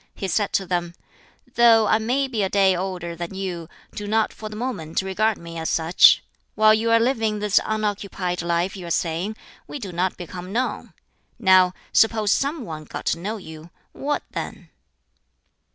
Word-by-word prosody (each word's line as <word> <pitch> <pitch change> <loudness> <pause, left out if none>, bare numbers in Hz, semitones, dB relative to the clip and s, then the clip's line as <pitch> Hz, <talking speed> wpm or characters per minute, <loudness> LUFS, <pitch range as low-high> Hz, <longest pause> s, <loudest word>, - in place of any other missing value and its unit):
He 195 - -4
said 205 +2 0
to 195 - +1
them, 175 -1 -2 0.6
"Though 230 -2 +6
I 220 - +3
may 255 +5 0
be 235 -5 -2
a 190 - +1
day 195 -2 +3
older 180 -2 -4
than 175 +2 -6
you, 180 -4 -5 0.2
do 205 - -6
not 220 +1 +1
(for 215 - -8
the 210 - -8
moment) 200 -9 -3
regard 210 +3 0
me 170 -1 -8
as 160 - -2
such. 165 +1 +5 0.3
While 215 0 +6
you 220 +1 +1
are 230 0 +5
living 225 -3 +1
this 210 -1 +3
unoccupied 200 -4 -2
life 170 +3 -1
you 180 -3 -8
are - - -5
saying, 170 +5 -1 0.3
'We - - -6
do 200 -9 -6
not 180 +2 -1
become 180 +1 -8
known.' 250 +4 -2 0.4
Now 185 -4 +5 0.2
suppose 220 -2 +3
some 280 0 0
one 155 -3 -7
got - - -7
to 165 - -7
know 210 +5 -4
you, 160 -3 -11 0.2
what 290 +1 -2
then?" - - -6
195 Hz, 180 wpm, -23 LUFS, 175-220 Hz, 0.6 s, Though